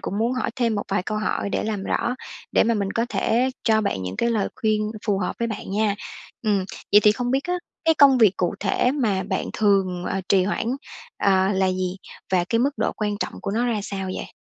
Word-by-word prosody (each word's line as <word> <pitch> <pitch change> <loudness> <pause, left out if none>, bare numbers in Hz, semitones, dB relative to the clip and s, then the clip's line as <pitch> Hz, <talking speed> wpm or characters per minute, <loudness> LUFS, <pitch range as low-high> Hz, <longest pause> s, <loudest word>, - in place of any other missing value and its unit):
cũng 200 - -3
muốn 230 +3 +1
hỏi 255 - -1
thêm 235 -3 +1
một 205 - -2
vài 195 -1 0
câu 215 +3 -3
hỏi 205 -1 -1
để - - -1
làm 210 -3 -2
rõ, 245 - 0 0.4
để - - +4
mà 230 - +2
mình 200 -2 -1
có 230 +1 0
thể 245 +3 +1
cho 220 -1 +4
bạn 200 - -1
những 90 +1 -5
cái 235 - +1
lời 215 -4 0
khuyên 215 -3 0 0.2
phù 200 -2 +2
hợp 185 - -2
với 235 0 0
bạn 210 -3 -6
nha. 210 0 +1 0.5
Ừm, 205 -3 +1 0.3
vậy 205 - +8
thì 210 0 +6
không 245 +2 -2
biết 270 +2 +1
á, 360 0 -1 0.3
cái 325 - +4
công 275 -4 +6
việc 205 -5 +5
cụ 175 - 0
thể 210 +5 +2
mà 215 -10 0
bạn 190 - -2
thường, 190 -4 +1
ờ, 195 - -1
trì 190 -2 +4
hoãn, 205 +3 -1 0.5
à, 190 0 +3
là 190 0 +2
gì? 185 0 -1 0.4
Và 180 -2 +3
cái 230 +5 0
mức 270 +4 +3
độ - - 0
quan 210 -1 -2
trọng - - -4
của - - -3
nó 235 +4 0
ra 225 -3 0
sao 195 -1 -4
vậy? - - -6
210 Hz, 240 wpm, -23 LUFS, 195-230 Hz, 0.5 s, vậy